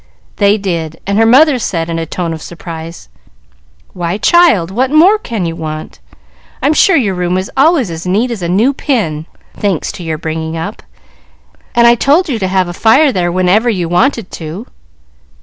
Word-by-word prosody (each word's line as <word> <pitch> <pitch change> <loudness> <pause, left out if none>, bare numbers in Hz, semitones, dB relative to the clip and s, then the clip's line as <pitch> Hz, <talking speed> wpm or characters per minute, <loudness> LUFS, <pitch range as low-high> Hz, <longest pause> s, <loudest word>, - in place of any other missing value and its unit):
They 205 +1 +3
did, 170 -6 -4
and 200 +2 0
her 225 - +4
mother 270 +3 +5
said 165 -7 -2
in 165 -1 -3
a 165 - -4
tone 170 0 -3
of 160 - -8
surprise, 165 - -9 0.9
"Why, 175 +2 -3
child, 225 - +3
what 255 +6 0
more 350 +9 +4
can 225 - -4
you 165 0 -3
want? 155 - -7 0.6
I'm 290 +3 +1
sure 380 +4 +4
your 225 -10 +1
room 180 0 -1
is 185 +1 -4
always 275 - +2
as 165 +2 -6
neat 220 +7 0
as 225 -5 -5
a 170 - -3
new 220 +10 +2
pin, 175 - -2 0.3
thanks 195 -6 -2
to 180 - -9
your 160 -2 -3
bringing 160 0 -4
up, 200 +6 -6 0.9
and 235 0 +4
I 235 - +7
told 290 +9 +2
you 240 -5 -2
to 190 - -1
have 185 -1 0
a 175 - -6
fire 265 - +4
there 175 -4 -1
whenever 185 +6 +2
you 180 -6 -1
wanted 220 +4 0
to." 165 +7 -7
190 Hz, 185 wpm, -13 LUFS, 170-240 Hz, 0.9 s, I